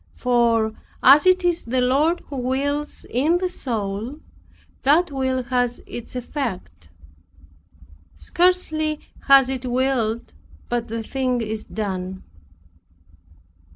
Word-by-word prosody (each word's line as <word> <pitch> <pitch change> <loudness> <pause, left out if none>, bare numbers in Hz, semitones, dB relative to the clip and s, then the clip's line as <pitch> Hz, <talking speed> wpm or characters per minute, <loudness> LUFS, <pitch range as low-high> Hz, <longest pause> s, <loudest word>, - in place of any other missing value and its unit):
For 235 -3 +2 0.3
as 285 +6 +7
it 370 0 +4
is 345 -1 +2
the 250 +2 -1
Lord 285 +7 +2
who 280 - -7
wills 280 +4 -2
in 300 +8 +2
the 365 0 -1
soul, 225 - -4 0.6
that 310 +5 +3
will 260 -1 -1
has 245 -1 0
its 240 +1 -8
effect. 215 - -5 1.3
Scarcely 315 - +1 0.3
has 275 -2 +7
it 260 -1 -3
willed 245 -3 -1 0.4
but 240 -1 -1
the 225 0 -4
thing 255 +1 -1
is 220 -1 -4
done. 190 -3 -4
255 Hz, 110 wpm, -22 LUFS, 230-290 Hz, 1.3 s, as